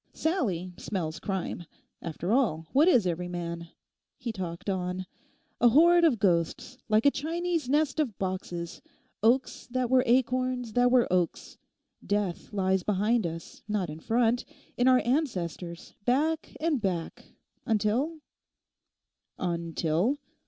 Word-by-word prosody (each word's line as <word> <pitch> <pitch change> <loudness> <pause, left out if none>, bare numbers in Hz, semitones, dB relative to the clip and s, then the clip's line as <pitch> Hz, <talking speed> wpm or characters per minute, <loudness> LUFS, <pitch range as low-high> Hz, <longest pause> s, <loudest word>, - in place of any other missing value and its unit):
Sallie 195 - -1
smells 165 -6 -3
crime. 190 -3 -3 0.4
After 170 +3 -4
all, 215 - +2
what 295 +5 +5
is 245 - +5
every 175 0 -1
man?' 170 -1 -5 0.5
he 235 - -4
talked 180 -3 -6
on; 185 -1 -2 0.5
'a 245 - +6
horde 340 +7 +6
of 305 -8 +4
ghosts—like 215 - 0
a 285 - +7
Chinese 330 0 -2
nest 295 0 +2
of 250 -10 0
boxes—oaks 185 +6 -2
that 250 0 -1
were 260 -1 +6
acorns 255 -1 +1
that 245 +1 +4
were 245 -1 +4
oaks. 180 -2 -1 0.4
Death 205 -4 -2
lies 190 -2 +1
behind 210 +2 +1
us, 165 0 -8
not 200 -6 -1
in 155 - -8
front—in 245 - 0
our 255 -1 +6
ancestors, 180 - -2
back 305 +7 0
and 310 -5 0
back, 180 -5 -4 0.3
until—' 230 +9 0 1.2
'"Until?" 170 - 0
215 Hz, 120 wpm, -28 LUFS, 180-260 Hz, 1.2 s, a